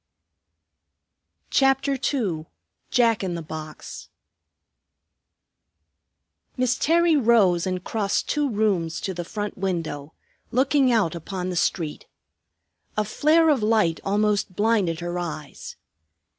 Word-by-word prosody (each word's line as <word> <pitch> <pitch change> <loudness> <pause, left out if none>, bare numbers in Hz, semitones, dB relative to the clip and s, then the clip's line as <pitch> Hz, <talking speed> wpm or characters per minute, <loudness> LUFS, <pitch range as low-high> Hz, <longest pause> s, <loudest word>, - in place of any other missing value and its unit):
CHAPTER 270 +1 +3
II 210 - -2 0.4
JACK 230 -4 +2
IN 180 -2 -2
THE 170 - -5
BOX 155 0 -8 2.5
Miss 255 0 +1
Terry 335 +2 +3
rose 215 - +3
and 185 -1 -3
crossed 205 -1 -1
two 295 -2 0
rooms 200 -7 0
to 190 - -3
the 175 0 -4
front 205 +3 -5
window, 160 -6 -3 0.4
looking 265 +1 +3
out 215 -9 +2
upon 180 +2 -5
the - - -4
street. 165 -3 -1 0.9
A 215 - +1
flare 315 +9 +3
of 280 -6 +3
light 210 -7 +2
almost 205 -1 0
blinded 205 -6 +1
her 175 +1 -3
eyes. 155 -4 -7
205 Hz, 110 wpm, -24 LUFS, 170-245 Hz, 2.5 s, CHAPTER